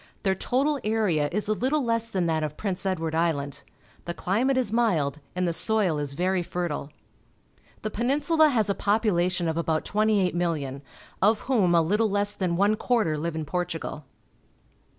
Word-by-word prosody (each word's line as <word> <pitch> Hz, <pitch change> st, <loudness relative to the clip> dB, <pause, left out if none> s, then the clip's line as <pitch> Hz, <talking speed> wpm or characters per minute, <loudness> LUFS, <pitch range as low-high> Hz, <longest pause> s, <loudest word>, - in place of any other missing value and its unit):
Their 190 Hz, -2 st, +2 dB
total 275 Hz, +9 st, 0 dB
area 205 Hz, -9 st, +1 dB
is 210 Hz, +3 st, 0 dB
a 215 Hz, -, +2 dB
Uttle 265 Hz, +7 st, 0 dB
less 230 Hz, -1 st, 0 dB
than 185 Hz, -5 st, -1 dB
that 160 Hz, -1 st, 0 dB
of 150 Hz, -1 st, -4 dB
Prince 195 Hz, -1 st, -3 dB
Edward 165 Hz, -4 st, -1 dB
Island. 160 Hz, -4 st, -1 dB, 0.4 s
The 170 Hz, -, -4 dB
climate 250 Hz, +8 st, +1 dB
is 240 Hz, -5 st, +1 dB
mild, 165 Hz, -12 st, +1 dB, 0.2 s
and 180 Hz, 0 st, 0 dB
the 170 Hz, -, 0 dB
soil 190 Hz, -3 st, +1 dB
is 140 Hz, -1 st, -4 dB
very 185 Hz, +3 st, +1 dB
fertile. 170 Hz, -4 st, -3 dB, 0.9 s
The 215 Hz, -, -2 dB
Peninsula 290 Hz, +7 st, +3 dB
has 225 Hz, -7 st, +1 dB
a 200 Hz, -, +2 dB
population 185 Hz, -5 st, +1 dB
of 160 Hz, 0 st, -1 dB
about 160 Hz, -1 st, 0 dB
28,000,000, 175 Hz, -10 st, 0 dB, 0.4 s
of 210 Hz, +2 st, +3 dB
whom 205 Hz, -10 st, +2 dB
a 165 Hz, -, +5 dB
httle 210 Hz, +6 st, +1 dB
less 205 Hz, 0 st, +1 dB
than 180 Hz, -4 st, -1 dB
one 205 Hz, +3 st, +3 dB
quarter 220 Hz, -12 st, +1 dB
live 160 Hz, +2 st, -3 dB
in 160 Hz, -1 st, -3 dB
Portugal. 165 Hz, -2 st, -4 dB
185 Hz, 170 wpm, -26 LUFS, 165-220 Hz, 0.9 s, a